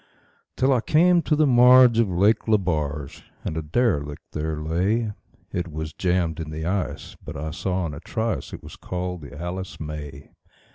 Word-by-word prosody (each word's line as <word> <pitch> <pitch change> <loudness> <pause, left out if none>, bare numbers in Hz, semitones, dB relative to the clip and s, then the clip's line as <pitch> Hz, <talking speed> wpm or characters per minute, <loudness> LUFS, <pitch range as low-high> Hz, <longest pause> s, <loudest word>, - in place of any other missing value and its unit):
Till 135 +1 +3
I 125 - +2
came 170 +6 +4
to 155 - +1
the 155 +1 +4
marge 125 -2 +7
of 115 -4 +3
Lake 100 +6 +2
Lebarge, 75 -9 -1 0.2
and - - -2
a 80 - -1
derelict 75 - -1
there 80 0 -3
lay; 95 +9 0 0.4
It 85 -2 -3
was 80 0 -5
jammed 90 -3 0
in 80 -2 -5
the 80 +1 -5
ice, 95 +2 -3
but 75 -1 -7
I 80 +2 -4
saw 90 +2 -2
in 80 - -4
a 70 - -7
trice 110 +5 -3
it - - -9
was - - -10
called 90 -1 -4
the 75 0 -10
"Alice 90 +2 -5
May". 75 -2 -7
90 Hz, 180 wpm, -24 LUFS, 75-110 Hz, 0.4 s, marge